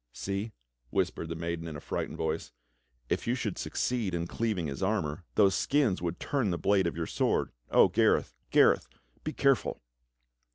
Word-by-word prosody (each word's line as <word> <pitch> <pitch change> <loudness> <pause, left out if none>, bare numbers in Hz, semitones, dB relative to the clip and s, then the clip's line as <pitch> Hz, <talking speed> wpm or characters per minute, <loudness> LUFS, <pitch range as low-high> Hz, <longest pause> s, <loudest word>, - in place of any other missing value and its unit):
"See," 100 - -3 0.4
whispered 80 - -1
the 85 - -3
maiden 85 0 -3
in 80 - -6
a - - -5
frightened - - -4
voice, 80 -3 -2 0.6
"if - - -1
you 120 - +2
should 110 -7 -3
succeed 115 -8 -1
in 85 0 -1
cleaving 105 -3 -1
his 70 +2 -4
armor, 90 -5 -1
those 100 -2 +5
skins 130 -5 +2
would 85 -1 -3
turn 135 -8 0
the 85 - 0
blade 100 -2 +3
of 85 - -3
your 85 - -1
sword. - - 0 0.2
O - - +6
Gareth, - - +2 0.2
Gareth, - - +5 0.4
be 155 - -2
careful!" 140 -6 +2
95 Hz, 170 wpm, -30 LUFS, 85-110 Hz, 0.6 s, O